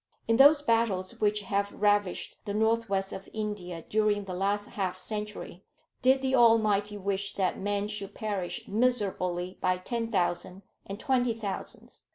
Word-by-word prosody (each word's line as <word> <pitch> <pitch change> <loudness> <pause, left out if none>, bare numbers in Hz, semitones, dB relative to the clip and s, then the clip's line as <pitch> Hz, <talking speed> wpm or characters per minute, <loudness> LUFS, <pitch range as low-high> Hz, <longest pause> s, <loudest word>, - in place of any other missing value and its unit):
In 230 - +3
those 290 +2 +7
battles 225 -7 0
which 210 0 +2
have 200 0 -1
ravished 205 -2 +1
the 205 -1 -3
North 225 +1 +1
west 195 -1 -1
of 190 - -8
India 200 -6 -5
during 210 -1 +1
the 190 -2 -6
last 200 +3 0
half 185 -2 -2
century, 210 -2 -5 0.4
did 265 +2 +4
the 265 0 0
Almighty 215 -4 +4
wish 200 0 -2
that 190 -2 0
men 205 +1 -1
should 205 -1 -5
perish 200 -5 -4
miserably 195 -6 0
by 185 0 +2
ten 230 +4 -3
thousands 180 0 -1 0.2
and 195 +1 -6
twenty 250 -4 +1
thousands? 205 -4 -7
205 Hz, 155 wpm, -29 LUFS, 195-225 Hz, 0.4 s, those